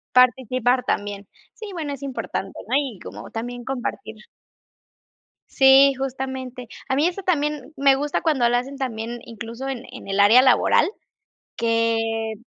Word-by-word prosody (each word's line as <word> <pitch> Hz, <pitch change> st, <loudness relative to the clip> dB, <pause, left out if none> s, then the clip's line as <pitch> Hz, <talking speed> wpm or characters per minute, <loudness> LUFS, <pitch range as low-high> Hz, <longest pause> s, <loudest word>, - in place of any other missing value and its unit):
Participar 250 Hz, 0 st, +3 dB
también. 205 Hz, -1 st, -3 dB, 0.3 s
Sí, 435 Hz, -, -9 dB
bueno, 305 Hz, -5 st, -4 dB
es 280 Hz, -, -12 dB
importante, 230 Hz, -7 st, -5 dB
¿no? 255 Hz, -, -1 dB
Y 265 Hz, -9 st, -4 dB
como -, -, -9 dB
también 245 Hz, +1 st, -6 dB
compartir 245 Hz, -4 st, -5 dB, 1.3 s
Sí, 270 Hz, +1 st, +6 dB
justamente. 260 Hz, -2 st, -5 dB, 0.2 s
A 265 Hz, -, 0 dB
mí 295 Hz, -, +3 dB
eso 365 Hz, +2 st, -2 dB
también 300 Hz, -5 st, -1 dB
me 275 Hz, 0 st, +5 dB
gusta 290 Hz, +2 st, -1 dB
cuando 265 Hz, -7 st, +2 dB
lo 245 Hz, -, +2 dB
hacen 265 Hz, +3 st, -3 dB
también, 240 Hz, -3 st, -4 dB
incluso, 230 Hz, +3 st, -7 dB
en 260 Hz, -2 st, -5 dB
en 255 Hz, -5 st, -10 dB
el 195 Hz, +1 st, 0 dB
área 225 Hz, +5 st, +7 dB
laboral, 260 Hz, -2 st, +4 dB, 0.7 s
que 225 Hz, -1 st, 0 dB
255 Hz, 145 wpm, -23 LUFS, 230-270 Hz, 1.3 s, área